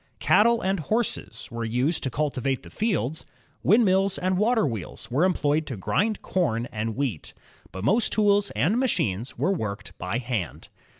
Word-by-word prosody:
Cattle 235 +2 +4
and 190 0 0
horses 220 +9 -2
were 115 0 -4
used 125 +8 0
to 130 - -1
cultivate 135 -1 -1
the - - -12
fields. 160 - -1 0.4
Windmills 195 -2 +3
and 185 +1 0
water 220 +3 +2
wheels 110 - -5
were 140 +7 +2
employed 155 -4 +1
to 130 - -5
grind 210 - 0
com 120 -11 0
and 110 0 -3
wheat. 130 - -3 0.4
But 95 - -7
most 215 - +2
tools 205 -1 +3
and 165 - +2
machines 120 - -1
were 155 +11 +1
worked 100 - -5
by 90 +6 -2
hand. 120 - -4
150 Hz, 160 wpm, -25 LUFS, -, 0.4 s, Cattle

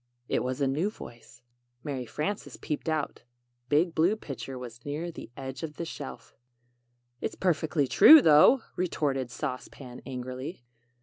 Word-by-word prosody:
It - - 0
was 130 +2 -3
a 140 - +3
new 155 +9 0
voice. 120 - -13 0.4
Mary 135 -4 -4
Frances 195 - -4
peeped 155 +1 -3
out. 155 -2 -2 0.5
Big 160 +4 +3
Blue 170 +7 +3
Pitcher 135 - -7
was 120 -2 -9
near 155 +4 -4
the 165 - -10
edge 130 -1 -6
of 155 -2 -6
the 170 - -4
shelf. 130 -7 -8 0.9
"It's - - -3
perfectly 160 -5 +1
true, 315 - +9
though," 225 - +6
re 180 - 0
tort 145 -5 -1
ed 130 -2 -3
Sauce 130 +1 -4
Pan, 125 -3 -11
angrily. 130 +2 -6
145 Hz, 160 wpm, -28 LUFS, 130-165 Hz, 0.9 s, true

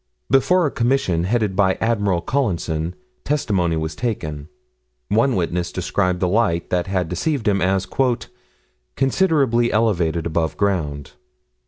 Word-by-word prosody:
Before 175 +7 +4
a 145 - 0
commission, 115 -9 +1
headed 105 -2 0
by 95 -1 +3
Admiral 105 -6 0
Collinson, 85 - -1 0.3
testimony 95 - 0
was 80 +1 -3
taken. 80 -11 -4 0.6
One 115 +6 +2
witness 90 -1 -1
described 90 0 -1
the 90 - +2
light 90 -4 +1
that 90 0 0
had 95 -3 -1
deceived 115 - -2
him 100 -2 +2
as 95 +1 +1 1.1
"considerably 135 -5 +2
elevated 90 -7 +1
above 80 -1 -1
ground." 75 -9 -1
95 Hz, 125 wpm, -21 LUFS, 85-115 Hz, 1.1 s, Before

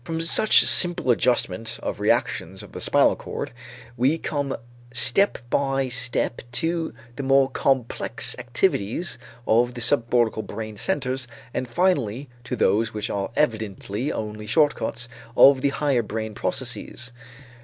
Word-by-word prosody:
From 160 +4 -4
such 165 +6 +5
simple 175 -8 +4
adjustment 115 -2 0
of - - -3
reactions - - 0
of - - -13
the - - -8
spinal - - +4
cord, - - -6 0.4
we 130 +6 +2
come 145 -4 -3 0.3
step 125 +11 +3
by 135 -1 +1
step 125 -1 -1
to 165 +3 0 0.3
the - - -3
more 135 0 +3
complex 130 -3 0
activities 120 - -1 0.3
of 120 +2 +2
the - - -6
subcortical 115 -3 +1
brain 110 -1 -7
centers, 130 - -1 0.3
and 130 - -2
finally 140 - 0 0.2
to - - -3
those 110 +4 +1
which 105 0 -2
are 100 -1 -2
evidently 110 -1 -1
only 105 0 -5
short 145 +7 +3
cuts 120 0 -4 0.3
of 135 -1 +7
the 140 - +2
higher 140 -3 +1
brain 110 0 -5
processes. 125 +1 -4
125 Hz, 135 wpm, -24 LUFS, 115-140 Hz, 0.4 s, of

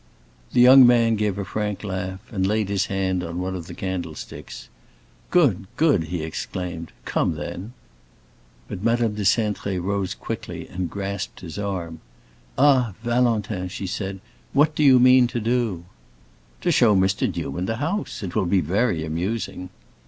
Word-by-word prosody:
The 120 - +5
young 130 0 +9
man 115 -2 +4
gave 105 -2 -1
a 100 - -3
frank 105 +1 -3
laugh, 95 -1 -4
and 95 -3 0
laid 105 -1 0
his 100 -2 0
hand 95 -2 -1
on 85 0 -5
one 95 +1 -3
of 85 -2 -7
the - - -8
candlesticks. 85 -9 -6 0.6
"Good, 120 - +3
good!" 145 - +3
he 80 0 -4
exclaimed. 85 +1 -5
"Come, - - 0
then." 90 +9 -6 0.9
But 90 - -6
Madame 115 -1 +2
de 105 - -4
Cintré 100 -2 +1
rose 100 +1 -2
quickly 105 -7 -6
and 90 -1 -4
grasped 100 +1 -5
his 85 +2 -7
arm, 90 -5 -4 0.6
"Ah, 130 -7 +4
Valentin!" 115 -6 0
she 95 +2 -6
said. 95 +1 -4 0.3
"What 150 +3 +4
do 150 - -2
you 135 -3 +7
mean 125 0 +6
to 120 - -3
do?" 115 -6 -1 0.8
"To - - +1
show 110 -4 +5
Mr. 95 0 +2
Newman 90 +7 -3
the 115 - -1
house. 160 - -3
It 90 -3 -5
will 90 - +1
be 95 +2 +3
very 90 0 0
amusing." 90 +3 -3
100 Hz, 160 wpm, -23 LUFS, 90-115 Hz, 0.9 s, young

